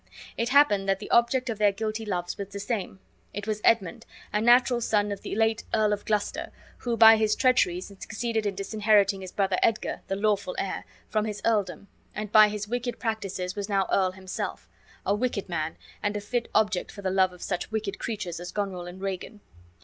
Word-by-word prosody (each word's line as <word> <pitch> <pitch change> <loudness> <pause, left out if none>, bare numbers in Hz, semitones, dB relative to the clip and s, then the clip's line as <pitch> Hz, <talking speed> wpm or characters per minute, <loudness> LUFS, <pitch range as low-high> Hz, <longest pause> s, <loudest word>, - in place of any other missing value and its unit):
It 230 0 -1
happened 250 -8 +4
that 195 - +3
the 205 - -9
object 250 +2 +3
of 225 -3 -3
their 205 -1 +5
guilty 220 +2 -4
loves 175 -3 -2
was 200 - -5
the 200 +1 -7
same. 200 -2 -3 0.4
It 205 0 -4
was 215 -1 -2
Edmund, 230 +1 +2 0.3
a 210 - +1
natural 240 +1 +5
son 210 -2 +1
of 200 - -5
the - - -5
late 220 0 +1
Earl 215 -1 +3
of 205 - -4
Gloucester, 210 -1 -1 0.3
who 235 -2 -2
by 225 0 +9
his 215 -1 +2
treacheries 185 -8 +2
had 200 -1 -16
succeeded 225 -1 -2
in 200 - -2
disinheriting 205 -1 +2
his 185 -1 -7
brother 195 -2 0
Edgar, 225 -1 0
the 195 - -1
lawful 200 -2 0
heir, 195 - -3 0.2
from 215 -1 0
his 210 -1 -4
earldom, 205 -3 0 0.3
and 210 0 -4
by 215 0 +8
his 210 0 -4
wicked 245 +1 -3
practices 195 -5 -3
was 205 0 -4
now 195 -2 +2
earl 185 -1 +2
himself; 190 0 -5 0.4
a - - +2
wicked 215 -2 -1
man, 160 -3 -3 0.2
and 205 0 -1
a - - -4
fit 235 +3 -2
object 210 -4 +1
for 200 - -10
the 190 - 0
love 190 -1 +3
of 180 - -11
such 180 -2 -3
wicked 215 -2 -3
creatures 205 -7 -4
as 175 0 -7
Goneril 190 -4 -3
and 180 +2 -9
Regan. 195 +2 -5
205 Hz, 205 wpm, -27 LUFS, 195-220 Hz, 0.4 s, by